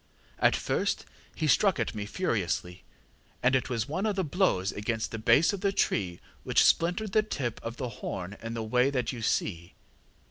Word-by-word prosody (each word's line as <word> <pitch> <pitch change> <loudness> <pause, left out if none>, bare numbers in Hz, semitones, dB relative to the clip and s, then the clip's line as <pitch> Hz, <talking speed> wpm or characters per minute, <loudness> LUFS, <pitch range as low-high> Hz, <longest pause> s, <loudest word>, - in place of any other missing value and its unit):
At - - +4
first - - -1 0.3
he 160 - -1
struck 185 +6 +3
at - - -1
me 105 -2 -4
furiously, 95 - -2 0.6
and 125 +2 +4
it 130 - 0
was 115 -3 -1
one 185 +8 -1
of 210 - 0
the 190 - 0
blows 145 - +1
against 110 +2 -3
the 110 - -4
base 115 - +4
of 195 - -4
the 200 -1 +2
tree 90 - 0 0.2
which - - +4
splintered 180 +5 +2
the 215 - +4
tip 130 - -3
of 115 +1 -5
the 125 - -3
horn 95 +2 -4
in 115 +1 -5
the 115 - -3
way 125 +4 +2
that 125 -4 -1
you 120 -3 -7
see. 85 -5 -1
120 Hz, 190 wpm, -29 LUFS, 105-170 Hz, 0.6 s, At